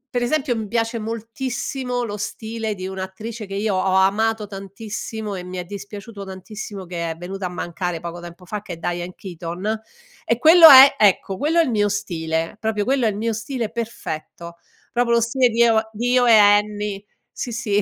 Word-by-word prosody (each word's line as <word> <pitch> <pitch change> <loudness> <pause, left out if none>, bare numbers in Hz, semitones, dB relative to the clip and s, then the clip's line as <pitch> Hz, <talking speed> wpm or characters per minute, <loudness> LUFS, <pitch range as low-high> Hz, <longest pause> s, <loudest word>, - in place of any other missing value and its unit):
per 245 - +1
esempio 270 -1 0
mi 220 -2 -4
piace 230 +1 -1
moltissimo 245 +3 -3
lo 205 -2 -5
stile 220 +1 -4
di 185 -1 -6
un'attrice, 190 +4 -6
che 195 0 -7
io 205 0 0
ho 185 0 +1
amato 210 +3 +2
tantissimo, 205 +2 -6
e 180 - -6
mi 180 +1 -7
è 180 - -4
dispiaciuto 200 +2 -8
tantissimo 190 +1 -8
che 170 -2 -4
è 160 - -7
venuta 185 +2 -5
a - - -7
mancare 175 0 -4
poco 170 +1 -7
tempo 175 +1 -11
fa, 205 +3 -5
che 210 - -8
è - - -8
Diane 175 +1 -4
Keaton, 180 +4 -5 0.5
e 230 - 0
quello 325 +4 +9
è 270 0 +10
ecco, 195 -1 +3
quello 320 +4 +1
è - - +6
il - - -2
mio 205 -3 +1
stile, 165 -4 -2
proprio 215 -2 -1
quello 265 -1 +1
è - - +3
il 205 - -4
mio 225 +1 -1
stile 225 +1 -3
perfetto, 170 -7 -6 0.4
proprio 240 -1 +2
lo - - +4
stile 245 +2 +2
di 235 +1 0
eo 220 -1 +3
di 240 +3 -1
"Io 250 -1 +4
e 230 -2 +7
Annie", 205 -1 +3 0.3
sì, 245 - -5
sì. 220 -3 0
210 Hz, 195 wpm, -21 LUFS, 190-230 Hz, 0.5 s, è